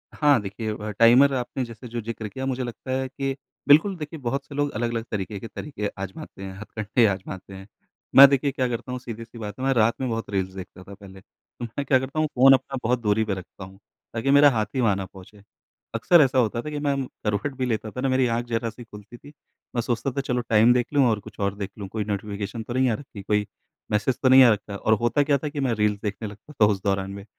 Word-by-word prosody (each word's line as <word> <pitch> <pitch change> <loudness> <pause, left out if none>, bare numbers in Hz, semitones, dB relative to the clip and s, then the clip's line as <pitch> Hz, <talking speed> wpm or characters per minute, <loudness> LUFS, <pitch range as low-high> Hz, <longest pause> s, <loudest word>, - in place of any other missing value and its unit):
हाँ, 145 -4 +4
देखिए, 105 +2 -4
वह 105 0 -5
टाइमर 120 +6 +6
आपने 125 +1 -3
जैसे 115 +1 -10
जो 120 0 -4
ज़िक्र 115 -1 -5
किया, 130 +5 -6
मुझे 130 -1 -2
लगता 125 +2 -7
है 130 0 -1
कि 135 0 -3 0.3
बिल्कुल, 160 +7 +5
देखिए 155 0 -7
बहुत 135 +2 -3
से 145 - -11
लोग 145 0 0
अलग-अलग 115 0 -1
तरीके 100 -1 -4
के 115 - -7
तरीके 110 -1 -5
आज़माते 95 0 -8
हैं, 95 -1 -6
हथकंडे 110 +2 0
आज़माते 95 0 -5
हैं। 95 0 -10 0.5
मैं 140 +1 +12
देखिए 140 +1 +1
क्या 130 -1 -1
करता 125 +1 -4
हूँ, 125 - -3
सीधी-सी 115 -1 -9
बात 105 +1 -7
है, 130 - -2
मैं 135 - +3
रात 115 -1 +3
में 130 - -1
बहुत 115 0 -3
रील्स 95 -2 -2
देखता 95 -1 -10
था 100 - -12
पहले, 95 -1 -13 0.4
मैं 120 +4 -4
क्या 130 -3 +4
करता 130 +4 -4
हूँ, 155 - +2
फ़ोन 135 +2 +7
अपना 135 +1 0
बहुत 125 +2 +1
दूरी 105 0 +2
पे 105 - -1
रखता 95 0 -9
हूँ 95 +1 -12 0.3
ताकि 115 +4 0
मेरा 145 +1 +7
हाथ 110 -5 0
ही 130 - +1
वहाँ 110 -5 +3
ना 95 0 -4
पहुँचे। 95 +2 -15 0.5
अक्सर 165 +9 +5
ऐसा 135 -2 +2
होता 115 -1 +1
था 150 - -6
कि 150 -1 -4
मैं 145 -1 0
म 135 -1 -2 0.2
करवट 105 +7 -1
भी 130 - -1
लेता 110 -3 -2
था 125 - -5
ना, 135 - +1
मेरी 130 -1 +2
आँख 120 +1 -1
ज़रा-सी 115 0 -3
खुलती 105 +1 -13
थी, 145 +4 -15 0.4
मैं 120 - +1
सोचता 120 +3 -2
था, 140 - -2
चलो 125 -2 -1
टाइम 115 +2 +6
देख 125 -1 +1
लूँ 140 -2 +4
और 110 -2 0
कुछ - - -14
और 100 0 -1
देख 100 -1 -4
लूँ, 100 -2 -6
कोई 105 +2 -3
नोटिफिकेशन 105 +1 -4
तो 120 - -6
नहीं 130 0 +2
आ - - +1
रखी, 120 -5 -10
कोई 105 +1 0 0.5
मैसेज 105 +5 +1
तो 130 - +5
नहीं 130 0 +9
आ 125 - +7
रखा। 105 -1 -6
और 110 +2 +1
होता 120 +5 +2
क्या 140 0 +2
था 150 +2 -4
कि 145 0 -6
मैं 130 -4 +1
रील्स 105 -1 +1
देखने 105 +1 -3
लगता 105 +9 -13
था - - +9
उस 95 -2 -3
दौरान 95 -1 -1
में, 100 0 -9
115 Hz, 250 wpm, -24 LUFS, 105-130 Hz, 0.5 s, मैं